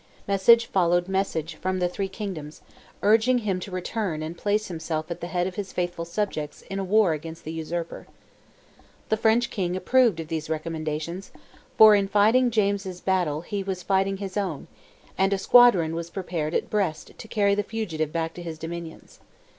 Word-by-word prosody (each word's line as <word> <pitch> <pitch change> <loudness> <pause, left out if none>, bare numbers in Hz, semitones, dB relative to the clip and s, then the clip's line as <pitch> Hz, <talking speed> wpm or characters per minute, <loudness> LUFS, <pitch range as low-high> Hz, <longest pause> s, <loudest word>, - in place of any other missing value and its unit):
Message 215 +4 +5
followed 175 -3 +2
message 190 -4 -1
from 185 +3 -2
the 180 -1 +1
three 195 +2 -3
kingdoms, 190 -7 -7 0.4
urging 225 +4 +4
him 200 -6 -1
to 190 - -7
return 185 -3 -3
and 160 +2 -5
place 210 +4 0
himself 160 -1 -4
at 170 - -5
the 175 - -4
head 175 0 -1
of 185 - -3
his 200 -2 -4
faithful 175 -1 -3
subjects 170 -5 -3
in 195 - -2
a - - -1
war 195 -2 +3
against 165 +2 -7
the 155 - -5
usurper. 165 +1 -5 1.0
The 220 - +2
French 225 +2 +2
king 180 -4 -2
approved 225 0 +3
of 160 - -5
these 160 -1 -4
recommendations, 160 +2 -4 0.5
for 220 -1 +9
in 200 -1 +3
fighting 220 +5 +4
James's 200 -4 -1
battle 175 -6 0
he 200 +3 -4
was 190 -2 -4
fighting 195 +1 +1
his 195 0 -5
own, 185 -8 -2 0.5
and 195 +1 +3
a - - +1
squadron 195 -6 +5
was 170 0 -4
prepared 170 -4 -3
at - - -1
Brest 185 -7 -1
to - - -10
carry 205 -2 +2
the 205 - +1
fugitive 175 -9 -3
back 165 0 -2
to 175 - -9
his 165 -2 -6
dominions. 165 0 -8
185 Hz, 180 wpm, -25 LUFS, 165-205 Hz, 1.0 s, for